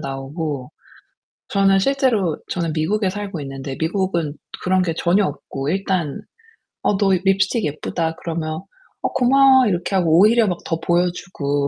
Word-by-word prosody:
나오고 135 0 -5 0.8
저는 195 -1 +3
실제로 230 - +1
저는 170 -3 -1
미국에 185 +6 0
살고 195 -4 -5
있는데 135 -1 -6
미국은 170 -3 -1 0.3
그런 185 0 +2
게 165 -3 -1
전혀 185 +4 +2
없고 140 -1 -5
일단 185 -5 -1 0.6
"어 205 - +1
너 195 -1 +2
립스틱 195 +3 +2
예쁘다." 160 +2 -2
그러면 160 -1 -3 0.4
"어 - - +1
고마워." 260 0 +5
이렇게 180 0 -1
하고 165 -4 +3
오히려 220 +3 +5
막 180 -2 -1
더 165 - -2
보여 175 +2 +2
주고 145 -6 -2
180 Hz, 305 characters per minute, -20 LUFS, 155-195 Hz, 0.8 s, 고마워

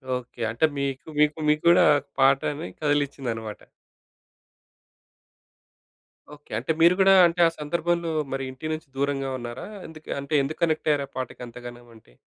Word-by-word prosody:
Okay. 125 -1 -8
అంటే 115 +8 +2
మీకు, 140 +2 -3
మీకు 150 +1 +3
మీగ్గూడా 170 +3 +5 0.3
పాటని 135 -4 +2
కదిలించిందన్నమాట. 135 -7 -2 2.8
ఓకే. 145 - -23
అంటే 130 +7 -2
మీరు 170 +2 +7
కూడా 195 0 +6
అంటే 170 +1 -1
ఆ - - +2
సందర్భంలో 170 +2 -1 0.2
మరి 135 0 -2
ఇంటి 145 +5 -6
నుంచి 155 -1 -7
దూరంగా 135 -1 -1
ఉన్నారా? 120 +6 -7 0.2
ఎందుకు 155 -1 -14
అంటే 140 +2 -6
ఎందుకు 145 +3 -6
కనెక్టయ్యారు? 155 -3 0
ఆ - - -41
పాటకి 130 - -5
అంతగానమంటె. 120 - -12
140 Hz, 125 wpm, -25 LUFS, 125-155 Hz, 2.8 s, మీరు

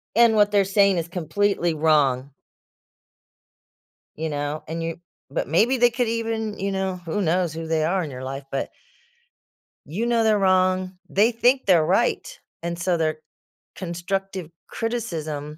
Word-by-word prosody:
And 230 -1 +5
what 205 -1 +4
they're 200 -1 +4
saying 195 -1 +3
is 165 0 -2
completely 175 +1 0
wrong 145 -4 +2 1.9
you 160 +1 -3
know, 145 +1 -3
and 165 +1 -4
you 165 0 -4 0.3
but - - -2
maybe 225 - +3
they 240 0 +5
could 235 0 -1
even, 225 -2 -2
you 195 0 -1
know 190 -1 -2
who 185 +6 -2
knows 175 -1 +1
who 165 0 -5
they 160 -1 +1
are 180 +2 +1
in 150 - -6
your 130 0 -7
life, 135 +1 -5
but 135 - -2 1.2
you 200 +10 -3
know 235 -1 +2
they're 215 -2 +3
wrong, 185 -1 +2
they 215 +5 +3
think 245 +3 +2
they're 170 -5 +4
right, - - 0 0.2
and 170 0 -4
so 175 0 +1
their 155 -1 0 0.6
constructive 185 0 -4 0.2
criticism 155 -10 -4
185 Hz, 155 wpm, -23 LUFS, 160-205 Hz, 1.9 s, And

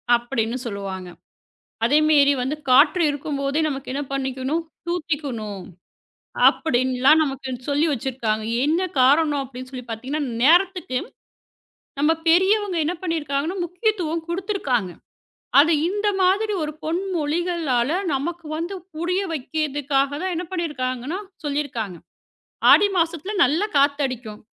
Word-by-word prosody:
அப்படின்னு 240 0 -2
சொல்லுவாங்க. 195 -4 -5 0.8
அதே 290 +6 +4
மேரி 285 -2 +5
வந்து 280 +4 -2
காற்று 305 +8 +5
இருக்கும்போதே 285 +1 -2
நமக்கு 270 -2 -5
என்ன 285 - -2
பண்ணிக்கணும்? 270 +4 -2 0.2
தூத்திக்கணும். 280 - -3 0.8
அப்படின்னுலாம் 260 +1 +3
நமக்குனு 270 -3 -4
சொல்லி 290 +3 +2
வச்சிருக்காங்க. 235 -5 -2 0.2
என்ன 320 +4 +2 0.2
காரணம் 290 +2 +4
அப்படின்னு 255 0 -9
சொல்லிப் 250 -2 -8
பார்த்தீங்கன்னா, 260 +7 -3 0.2
நேரத்துக்கு 350 -3 +3 1.0
நம்ம 300 +3 +4 0.2
பெரியவங்க 380 +3 +3
என்ன 345 +4 -1
பண்ணிருக்காங்கனா, 320 0 -2
முக்கியத்துவம் 350 -3 -1
கொடுத்திருக்காங்க. 340 - -1 0.7
அது 325 +4 +5 0.2
இந்த 410 +2 -1
மாதிரி 410 +4 +2
ஒரு 305 - -3
பொன்மொழிகளால 330 -6 -1 0.2
நமக்கு 330 +5 -3
வந்து 345 +4 -4 0.2
புரிய 360 +4 0
வைக்கிறதுக்காகதான் 290 +2 -1
என்ன 355 +2 -3
பண்ணிருக்காங்கன்னா, 295 -2 -3 0.2
சொல்லிருக்காங்க. 260 - -3 0.7
ஆடி 405 - +7
மாசத்துல 335 +4 -1
நல்லா 310 +10 +2
காத்தடிக்கும். 265 -6 0
290 Hz, 105 wpm, -22 LUFS, 255-340 Hz, 1.0 s, ஆடி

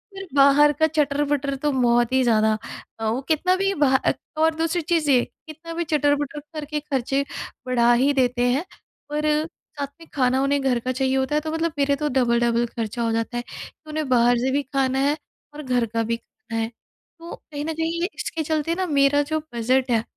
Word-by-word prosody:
पर 390 - -6
बाहर 280 +2 +6
का 315 +3 +2
चटर-पटर 290 -2 0
तो 295 +2 -1
बहुत 240 -2 +2
ही 260 - +4
ज़्यादा 220 -2 +3 0.4
अ, 225 - -3
उ 235 +5 0
कितना 365 +4 +2
भी 390 +1 0
बाह 265 -1 +4
अ, - - +1 0.2
और 320 0 +3
दूसरी 330 +2 0
चीज़ 320 -2 0
ये 245 -2 +5 0.2
कितना 325 +2 -9
भी 340 +1 -1
चटर-पटर 290 -1 0
करके 300 0 -3
खर्चे 275 -1 -1 0.4
बढ़ा 240 -1 +3
ही 265 +4 +3
देते 250 -2 +1
हैं 290 +8 0 0.4
पर 300 +1 -2 0.2
साथ 285 -3 -8
में 330 - -13
खाना 260 -1 +2
उन्हें 280 0 +1
घर 255 -3 +1
का 255 +2 -2
चाहिए 265 +1 0
होता 265 +3 0
है 300 - +2
तो 315 0 -4
मतलब 325 0 -1
मेरा 280 0 +3
तो 300 +1 -2
डबल-डबल 235 -2 +2
खर्चा 230 0 -3
हो 230 - 0
जाता 230 +2 -2
है। 240 - -3 0.4
उन्हें 305 -2 -3
बाहर 245 -1 +4
से 260 +2 0
भी 285 +1 +1
खाना 265 0 0
है 290 +3 +2 0.4
और 300 +1 -8
घर 250 -3 +1
का 230 +1 -2
भी 230 +1 -1
खाना 230 -1 -8
है। 225 - -1
तो 335 +8 -14
कहीं 295 -1 -7
न 320 - -2
कहीं 330 +1 -2
ये 360 - 0
इसके 320 -1 -3
चलते 315 +2 -1
ना 370 +1 -1
मेरा 285 -1 +3
जो 315 - +1
बजट 250 +2 +1
है 225 -1 +2
275 Hz, 210 wpm, -23 LUFS, 245-305 Hz, 0.4 s, बाहर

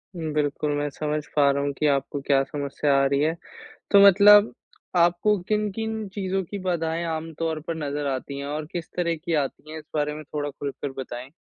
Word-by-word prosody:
उम, 160 -3 -4
बिल्कुल, 150 0 0
मैं 145 0 -1
समझ 150 +1 -3
पा 140 -1 +5
रहा 140 0 -1
हूँ 140 - 0
कि 150 - -2
आपको 140 0 0
क्या 135 0 +3
समस्या 140 0 -1
आ 135 - +3
रही 140 0 +1
है। 155 +2 +2 0.6
तो 200 - +8
मतलब 205 +2 +7 0.4
आपको 175 +4 +3
किन-किन 215 +1 -2
चीज़ों 190 -1 -1
की 200 +4 -7
बाधाएँ 165 -1 -1
आम 160 +1 -6
तौर 160 -1 -1
पर 165 - -2
नज़र 145 0 -2
आतीं 140 +2 -4
है 140 - -5
और 150 +1 -3
किस 170 -2 -5
तरह 170 -1 +1
की 165 +2 -4
आतीं 155 +3 -8
है? 160 - -6
इस 150 - -14
बारे 150 0 0
में 155 +1 -8
थोड़ा 145 0 -4
खुलकर 140 0 -5
बताएँ। 125 0 -7
155 Hz, 205 wpm, -25 LUFS, 145-175 Hz, 0.6 s, तो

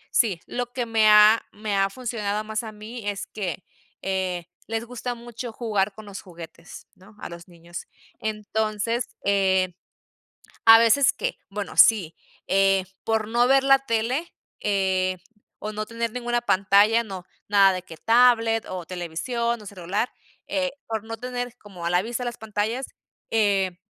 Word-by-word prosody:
Sí, 200 -8 +3
lo 245 0 -3
que 245 -2 -2
me 220 -2 +4
ha 210 +1 +7
me 210 -1 -3
ha 195 0 +2
funcionado 215 -3 -3
más, 215 0 -3
a 220 - -6
mí, 215 +1 -8
es 195 -1 -4
que, 190 -4 -5 0.4
eh, 185 -3 -2 0.2
les 225 +1 -2
gusta 245 0 -5
mucho 235 0 -7
jugar 210 -4 0
con 215 - -11
los 200 -1 -8
juguetes, 170 -2 -12
¿no?, 200 +3 -19
a - - -7
los 170 0 -10
niños. 170 0 -10 0.3
Entonces, 220 +2 -2 0.2
eh, 190 -2 +2 0.9
a 225 0 +11
veces 230 +4 +5
que, - - -3
bueno, 200 0 -5
sí, 190 -8 +6 0.3
eh, 195 -1 +3 0.2
por 220 -1 0
no 240 +2 +3
ver 270 0 +5
la 270 0 +6
tele, 245 +8 0 0.3
eh, 190 -2 +1 0.4
o 215 0 -5
no 215 0 -4
tener 230 -1 -3
ninguna 240 0 -1
pantalla, 205 +2 +4
no, 190 -4 -7 0.2
nada 195 -1 +6
de 185 - -3
que 170 -3 -12
tablet, 230 +1 +4
o 185 -2 -5
televisión, 200 +7 -2
o 210 - -13
celular, 195 +4 -2 0.4
eh, 275 -2 -1
por 220 -2 -3
no 225 0 -6
tener 245 0 -5
como 180 -5 -9
a - - +1
la 180 +1 +3
vista 240 +2 -4
las 240 - -4
pantallas, 220 +4 -2 0.4
eh, 195 -5 +1
215 Hz, 160 wpm, -24 LUFS, 195-235 Hz, 0.9 s, a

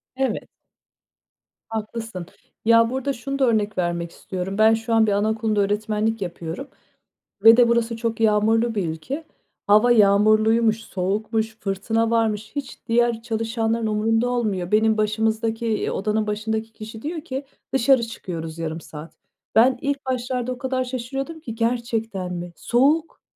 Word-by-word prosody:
Evet. 265 0 -2 1.2
Haklısın. 220 -3 -5 0.4
Ya, 230 0 +5
burada 265 +2 -2
şunu 275 +3 -5
da 265 - +4
örnek 215 -3 +1
vermek 170 -1 -1
istiyorum. 190 +1 -5
Ben 220 +1 +6
şu 225 +1 -2
an 225 -1 +4
bir 205 - +2
anaokulunda 215 +1 +1
öğretmenlik 215 +2 0
yapıyorum 175 - -5 0.8
ve 225 +1 +9
de 245 -1 +6
burası 235 -1 +1
çok 230 -1 -2
yağmurlu 225 +1 +2
bir 190 -5 0
ülke. 260 - -5 0.4
Hava 215 +4 +5
yağmurluymuş, 215 +1 +4
soğukmuş, 215 +4 -2
fırtına 220 +3 -1
varmış, 220 -2 0
hiç 280 -3 -5
diğer 235 0 +2
çalışanların 225 -1 -1
umurunda 225 +3 +1
olmuyor. 210 -8 -1
Benim 220 +1 +3
başımızdaki, 220 +2 0
eee, 220 -2 0
odanın 215 +1 -1
başındaki 220 +1 -2
kişi 220 +1 -9
diyor 320 +4 -4
ki, 275 -3 -5 0.3
dışarı 265 -1 +4
çıkıyoruz 165 -7 -6
yarım 165 0 -4
saat. 155 +1 -10 0.4
Ben 250 +3 +5
ilk 285 0 -2
başlarda 250 -1 -2
o 250 - -4
kadar 260 +1 -1
şaşırıyordum 270 +5 -5
ki 235 -8 -7
gerçekten 225 -5 -2
mi? 175 0 -6
Soğuk 290 - +1
225 Hz, 140 wpm, -23 LUFS, 210-240 Hz, 1.2 s, ve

